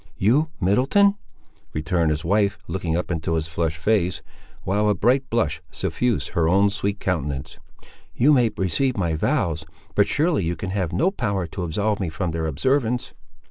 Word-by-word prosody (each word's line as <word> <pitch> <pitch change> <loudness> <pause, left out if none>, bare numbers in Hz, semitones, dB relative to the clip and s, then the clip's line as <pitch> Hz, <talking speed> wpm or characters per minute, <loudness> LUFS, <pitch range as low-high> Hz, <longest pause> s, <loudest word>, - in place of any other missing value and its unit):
"You, 135 +11 +3
Middleton!" 130 - +4 0.6
returned 80 +1 0
his 75 +1 -2
wife 100 +2 +2
looking 85 -3 -2
up 90 - -3
into 80 0 -1
his 80 -1 -1
flushed 80 0 -2
face, 90 +1 0 0.4
while 105 +3 +1
a 105 - +2
bright 130 +7 +2
blush 85 -10 0
suffused 100 +6 -1
her 80 -1 +1
own 100 +3 +4
sweet 100 +1 -2
countenance; 75 -7 -3 0.6
"you 145 +5 +5
may 125 -4 +4
receive 110 - 0
my 85 -4 0
vows, 80 0 0 0.3
but 100 - +3
surely 155 - +1
you 85 +1 -1
can 95 +3 -5
have 95 -4 -1
no 135 - +2
power 100 - -1
to 90 +3 -6
absolve 100 +5 -1
me 95 -4 -2
from 85 +1 -3
their 80 0 -2
observance!" 125 - 0
95 Hz, 170 wpm, -23 LUFS, 80-110 Hz, 0.6 s, you